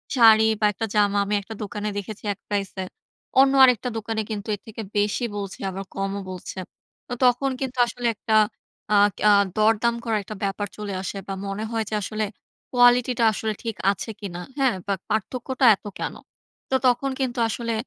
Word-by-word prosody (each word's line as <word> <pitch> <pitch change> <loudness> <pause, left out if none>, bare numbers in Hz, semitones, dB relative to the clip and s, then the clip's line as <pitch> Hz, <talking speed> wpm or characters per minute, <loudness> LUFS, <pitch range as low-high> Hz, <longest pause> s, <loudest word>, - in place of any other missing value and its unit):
শাড়ি 220 -3 +7
বা 215 - +2
১ - - -16
টা - - +2
জামা 205 -1 +3
আমি 205 - -2
১ 200 - -11
টা 220 - -5
দোকানে 210 +1 -4
দেখেছি 205 +1 -6
১ - - -22
প্রাইসে। 195 -2 -2 0.6
অন্য 270 0 +6
আরেকটা 250 -1 +4
দোকানে 220 0 -2
কিন্তু 210 -1 -5
এর - - -15
থেকে 220 0 -7 0.2
বেশি 205 +4 +1
বলছে 200 -2 -5
আবার 190 +1 -5
কমও 195 +1 -2
বলছে। 185 +1 -7 0.5
তো 245 - -5
তখন 250 +2 +3
কিন্তু 260 -1 -4
আসলে 240 +1 -6
১ - - -32
টা 220 - +5 0.6
আ - - +5 0.2
কিয়া 210 - +4 0.3
দরদাম 225 +2 +3
করার 220 -2 0
একটা 215 - -8
ব্যাপার 200 +1 -1
চলে 210 -2 -5
আসে 195 +1 -5
বা 195 - -3
মনে 195 +2 -3
হয় 225 -1 0
যে - - -7
আসলে 215 +2 -2 0.5
কোয়ালিটি 245 0 +5
টা - - +3
আসলে 215 +1 -2
ঠিক 225 -2 -3 0.2
আছে 200 +3 -6
কিনা? 180 -4 -6 0.2
হ্যাঁ? 265 -5 +2
বা 200 - +1 0.2
পার্থক্যটা 255 +5 -1
এত 195 - -33
কেন? - - -3 0.6
তো 265 - +1
তখন 250 +2 +2
কিন্তু 255 -2 -1
আসলে 230 +1 -2
215 Hz, 190 wpm, -24 LUFS, 200-240 Hz, 0.6 s, শাড়ি